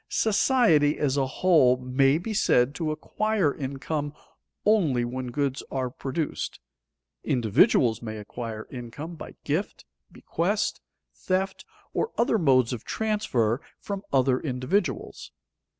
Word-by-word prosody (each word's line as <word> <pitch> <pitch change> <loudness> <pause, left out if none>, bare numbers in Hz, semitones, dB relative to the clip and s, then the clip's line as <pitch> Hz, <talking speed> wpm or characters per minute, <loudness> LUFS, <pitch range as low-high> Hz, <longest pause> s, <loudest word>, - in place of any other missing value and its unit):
Society, 215 - +3
as 140 -2 +1
a 135 -2 +1
whole, 135 -4 +4
may 135 +3 +2
be 215 +6 -4
said 125 -10 +3
to 160 0 -2
acquire 185 +1 0
income 145 +2 -4 0.5
only 160 - +3
when 125 +1 -4
goods 135 +2 -1
are 130 -2 -2
produced; 140 +4 -4 0.6
individuals 115 0 +3
may 110 -2 -5
acquire 110 +1 -6
income 130 +6 -7
by 165 - -10
gift, 160 +8 -2 0.3
bequest, - - -1 0.3
theft, 190 +1 -2 0.3
or 455 - -1
other 235 -2 +2
modes 130 -7 +3
of 120 - -6
transfer 155 - 0 0.2
from 200 -1 -5
other 130 -1 +3
individuals. 145 +8 -2
140 Hz, 120 wpm, -26 LUFS, 125-180 Hz, 0.6 s, whole